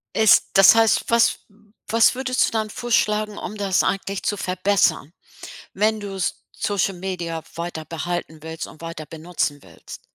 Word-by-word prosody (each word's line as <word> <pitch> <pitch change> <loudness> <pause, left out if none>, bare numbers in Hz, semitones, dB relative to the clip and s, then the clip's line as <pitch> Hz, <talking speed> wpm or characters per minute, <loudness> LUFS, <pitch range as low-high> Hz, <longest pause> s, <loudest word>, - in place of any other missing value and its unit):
Ist 220 -3 +5
das 195 +3 +8
heißt, 225 -1 +3
was 235 0 +3 0.5
was 230 +2 +4
würdest 255 0 +1
du - - -7
dann 220 -1 -1
vorschlagen, 215 -3 0
um 215 - -6
das 195 -2 +1
eigentlich 195 0 -2
zu 205 - -1
verbessern, 185 -4 0 0.6
wenn 215 +2 +1
du 200 -1 -6
S 190 - -1 0.3
Social-Media 180 -4 -2
weiter 170 -1 -5
behalten 165 -1 -5
willst 160 0 -6
und 155 - -15
weiter 165 -2 -7
benutzen 155 -1 -3
willst? - - -12
195 Hz, 150 wpm, -22 LUFS, 170-215 Hz, 0.6 s, das